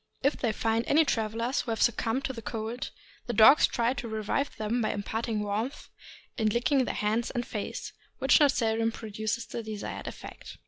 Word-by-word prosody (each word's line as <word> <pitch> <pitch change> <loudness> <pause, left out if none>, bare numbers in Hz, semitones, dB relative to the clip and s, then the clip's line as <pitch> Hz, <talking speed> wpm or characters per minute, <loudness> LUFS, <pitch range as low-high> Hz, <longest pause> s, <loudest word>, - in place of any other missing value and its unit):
If 280 +2 +3
they 235 - 0
find 225 +1 0
any 315 +2 +5
travelers 230 +1 0
who - - -8
have 225 -1 -1
succumbed 240 +2 +1
to 265 - -2
the 230 - -7
cold, 225 +2 -4 0.4
the 240 - -1
dogs 235 +7 +7
try 235 0 +1
to 245 -2 -5
revive 220 +6 -2
them 220 +3 -1
by 215 - 0
imparting 220 +1 -2
warmth 215 +6 -3 0.5
in 215 -1 +3
licking 250 +4 +2
their - - -3
hands 220 +3 0
and 245 -2 -3
face, 210 - -5 0.2
which - - +5
not 290 -2 +6
seldom 225 -2 +1
produces 220 +1 -3
the 235 - -5
desired 215 -2 -6
effect. - - -9
230 Hz, 185 wpm, -29 LUFS, 220-245 Hz, 0.5 s, dogs